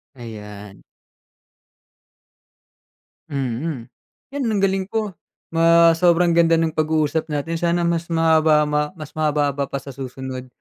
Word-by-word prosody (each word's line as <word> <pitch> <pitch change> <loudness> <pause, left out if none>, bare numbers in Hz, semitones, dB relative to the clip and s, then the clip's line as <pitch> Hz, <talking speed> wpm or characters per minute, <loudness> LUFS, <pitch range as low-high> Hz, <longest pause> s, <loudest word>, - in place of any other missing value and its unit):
Ayan. 105 -4 -10 2.5
Mm, 130 -1 -4 0.4
'yan 280 0 -3
ang 210 -3 0
galing 190 -1 +1
po. 215 -2 -2 0.4
Ma 165 0 +5
sobrang 175 0 +3
ganda 165 -1 +4
ng 165 -1 0
pag 155 0 +1
uusap 155 0 0
natin. 150 +3 -2
Sana 175 0 +1
mas 170 0 -1
mahaba, 160 -2 +4
ma 150 0 -1
mas 155 -4 -9
mahaba-haba 145 -2 0
pa 140 - -4
sa 140 - -8
susunod. 130 -1 -7
155 Hz, 125 wpm, -21 LUFS, 140-170 Hz, 2.5 s, Ma